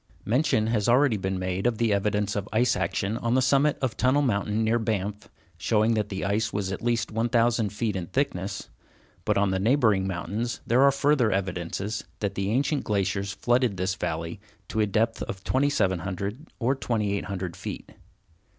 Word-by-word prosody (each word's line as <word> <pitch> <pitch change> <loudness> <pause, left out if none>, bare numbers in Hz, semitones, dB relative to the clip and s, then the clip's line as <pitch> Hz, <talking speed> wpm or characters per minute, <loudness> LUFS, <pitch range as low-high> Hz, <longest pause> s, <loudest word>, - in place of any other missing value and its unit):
Mention 115 -2 +2
has 110 -1 +1
already 130 0 +4
been 95 -1 -2
made 95 +3 -1
of 120 -2 0
the 115 -2 +2
evidence 105 0 0
of 105 0 -3
ice 120 +3 +3
action 100 +3 -1
on 120 +1 0
the - - +4
summit 140 +3 +3
of 125 -4 0
Tunnel 130 +3 +3
Mountain, 105 -2 0
near 115 +2 +2
Banff, 105 -2 -3 0.3
showing 110 +4 +2
that 105 -2 -1
the 95 -3 -3
ice 110 +3 0
was 100 -2 -2
at 95 - -4
least 120 0 0
1000 115 -1 +2
feet 105 +1 -2
in 90 -3 -3
thickness, 100 - -2 0.6
but - - +2
on 100 -1 +2
the 95 - 0
neighboring 110 -4 +3
mountains 105 +6 -3
there 120 +3 +3
are 140 - +7
further 140 -4 +2
evidences 95 +2 -2 0.2
that 100 -2 -1
the 100 0 -2
ancient 140 +6 +1
glaciers 100 -1 -1
flooded 120 -3 +1
this 95 +2 0
valley 80 -1 -4 0.3
to 110 - -2
a 105 - +3
depth 115 +3 0
of 95 0 -5
2700 100 - 0
or 130 +2 +1
2800 100 -7 -2
feet. - - -7
105 Hz, 175 wpm, -26 LUFS, 95-120 Hz, 0.6 s, are